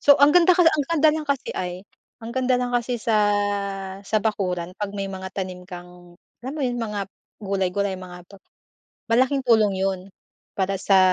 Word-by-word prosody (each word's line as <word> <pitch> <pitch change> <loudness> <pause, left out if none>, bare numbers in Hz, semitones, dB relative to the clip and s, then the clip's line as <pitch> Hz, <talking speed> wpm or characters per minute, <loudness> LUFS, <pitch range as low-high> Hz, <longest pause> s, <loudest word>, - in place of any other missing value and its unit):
so 285 -1 +6
ang 285 +1 +7
ganda 355 0 +6
ang 325 -5 +4
ganda 320 -2 +4
lang 310 -1 -3
kasi 275 -2 -1
ay, 180 +1 -5 0.4
ang 225 - -6
ganda 260 -1 +1
lang 245 0 -2
kasi 245 0 0
sa 225 -1 0 0.8
sa 205 +2 -1
bakuran 180 -5 -2
'pag 205 -1 -3
may 195 -1 -3
mga 190 0 -6
tanim 185 -2 -5
kang, 175 -1 -12 0.2
alam 260 +3 -6
mo - - -4
'yon, 245 -1 -1
mga 210 -2 -3 0.4
gulay-gulay 195 0 -1
mga 180 -1 -10
tot 200 -1 -15 0.7
malaking 260 +4 +3
tulong 220 -5 +4
'yon, 190 -1 -1 0.6
para 195 0 0
sa 195 -1 +4
205 Hz, 175 wpm, -23 LUFS, 190-255 Hz, 0.8 s, ang